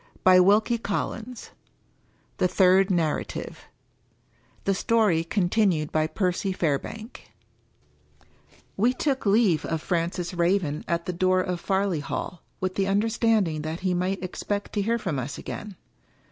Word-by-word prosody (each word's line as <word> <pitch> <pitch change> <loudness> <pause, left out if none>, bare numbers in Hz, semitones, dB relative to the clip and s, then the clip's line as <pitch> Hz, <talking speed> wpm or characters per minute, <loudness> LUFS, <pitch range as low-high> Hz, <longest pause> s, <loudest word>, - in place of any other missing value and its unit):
254 185 0 +7
Wilkie 220 +4 +4
Collins 225 +3 -4 0.9
THE 185 - +3
THIRD 190 +1 +4
NARRATIVE 165 -5 -2 1.0
THE 195 - +1
STORY 200 -5 +2
CONTINUED 175 -3 +1
BY 155 0 +1
PERCY 185 +2 -1
FAIRBANK 185 - -3
XIV - - -33 0.5
We 235 +6 +3
took 265 -5 -1
leave 200 -6 +3
of 160 - -2
Francis 175 +2 -2
Raven 170 -3 0
at 170 0 -1
the 180 - -3
door 185 +1 +2
of 180 -1 -3
Farleigh 190 -5 0
Hall, 160 +4 -5 0.2
with 185 0 -2
the 195 0 0
understanding 205 -5 +1
that 160 +3 -5
he 185 -1 0
might 185 +2 -1
expect 200 +2 -4
to 205 - 0
hear 230 +4 +1
from 185 - -3
us 140 +3 -5
again. 210 -2 -7
185 Hz, 135 wpm, -25 LUFS, 170-205 Hz, 1.0 s, 254